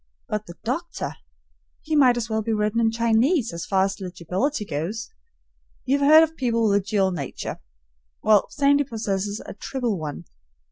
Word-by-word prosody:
But 210 0 -3
the 170 - -9
doctor! 305 +10 -3 0.7
He 310 0 -1
might 255 -4 +5
as 235 -1 -2
well 220 0 -1
be 225 +1 -1
written 210 +1 0
in 225 - +3
Chinese 230 - +2
so 170 - -6
far 190 +3 +1
as 195 0 -2
legibility 190 - -2
goes. 185 - -4 0.7
You 275 +2 +2
have 280 - +2
heard 315 +1 +9
of 320 0 -2
people 230 -4 +1
with 200 0 +3
a - - -18
dual 195 -1 +1
nature; 145 -7 -5 0.6
well, 210 -1 +4
Sandy 285 0 +3
possesses 205 -5 -3
a - - -7
triple 235 -1 -3
one. 145 - -6
220 Hz, 175 wpm, -24 LUFS, 195-260 Hz, 0.7 s, heard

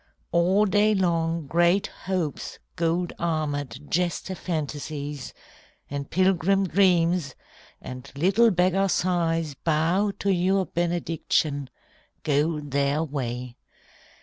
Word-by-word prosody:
All 185 +5 +3
day 210 +2 +3
long 165 -3 0
Great 175 +6 +3 0.2
Hopes 180 -6 -2 0.2
gold 170 +1 0
armoured, 145 -6 -2
jester 180 +2 0
Fantasies, 150 -5 -4 0.6
And 140 0 -4
pilgrim 190 +1 +2
Dreams, 175 -5 +2 0.4
and 125 0 -9
little 195 +10 +4
beggar 185 +1 +2
Sighs, 165 -4 0
Bow 165 +8 +1
to 200 - 0
your 190 +2 +2
benediction, 165 -4 -1 0.5
go 150 +2 +1
their 145 +1 0
way. 125 -4 -4
165 Hz, 95 wpm, -25 LUFS, 145-185 Hz, 0.6 s, little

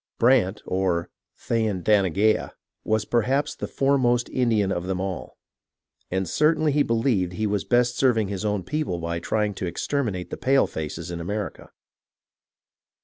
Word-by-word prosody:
Brant, 115 -5 +3
or 90 -2 -1 0.3
Thayendanegea, 105 -2 +1 0.3
was 110 -1 0
perhaps 125 +6 +1
the - - -5
foremost 130 -3 +2
Indian 110 -6 +1
of 90 -1 -2
them 95 -1 -1
all, 95 -1 -5 0.7
and 95 0 -1
certainly 155 0 +2
he 145 +1 +2
believed 115 -8 +1
he 110 +4 -2
was 105 -1 0
best 120 0 +2
serving 120 -5 +3
his 100 0 -4
own 105 -3 -1
people 150 - -2
by 85 0 -3
trying 105 +4 -1
to 95 -1 -4
exterminate 100 -2 -2
the - - -4
palefaces 85 - 0
in 85 -1 -5
America. 100 +4 -5
105 Hz, 140 wpm, -24 LUFS, 95-120 Hz, 0.7 s, Brant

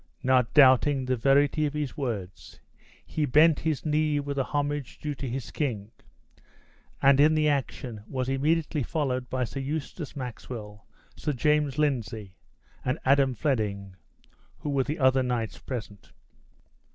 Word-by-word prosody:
Not 130 -2 +3
doubting 135 -1 +5
the 130 0 +1
verity 140 +5 +3
of 145 - -6
his 150 -3 -3
words, 110 - -5 0.5
he 155 - -1
bent 155 +4 +5
his 155 -2 -2
knee 150 -1 +1
with 140 0 -4
the 135 - +1
homage 145 -2 -2
due 150 -1 -4
to 135 -1 -5
his 130 +1 -5
king; 115 -8 -3 1.1
and 140 0 +6
in 155 +2 +5
the 155 0 +2
action 130 -6 -2
was 130 -1 -3
immediately 150 +3 0
followed 130 -3 -2
by 130 -1 -1
Sir 125 +3 -5
Eustace 150 +2 -5
Maxwell, 110 -5 -7 0.3
Sir 150 - -2
James 150 +1 +1
Lindsay, 115 -9 -1 0.5
and 125 +4 0
Adam 135 -1 +4
Fleming, 105 -10 -2 0.7
who 150 - -3
were 135 -1 +2
the 150 - -3
other 130 -1 +4
knights 120 -3 -2
present. 110 -6 -7
135 Hz, 145 wpm, -27 LUFS, 125-150 Hz, 1.1 s, and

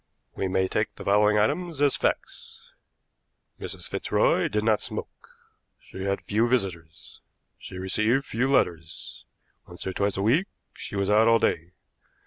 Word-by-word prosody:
We 95 - -1
may 95 0 +1
take 105 +3 -2
the - - -9
following 105 +1 +4
items 150 +8 0
as 145 -1 +3
facts: - - -4 0.9
Mrs. - - -6
Fitzroy - - +1
did 105 0 -1
not 110 -1 +2
smoke. - - -7 0.5
She 95 - -8
had 100 0 -1
few 110 +3 +1
visitors. 90 -9 -3 0.4
She 95 - -9
received 110 +8 +1
few 125 +4 -1
letters. 85 - -1 0.4
Once 90 0 -9
or 95 - -3
twice 100 0 0
a 95 - -1
week 145 - +3 0.3
she - - -8
was 100 0 0
out 110 +2 +5
all 115 0 +6
day. 85 -4 -1
105 Hz, 150 wpm, -26 LUFS, 95-115 Hz, 0.9 s, all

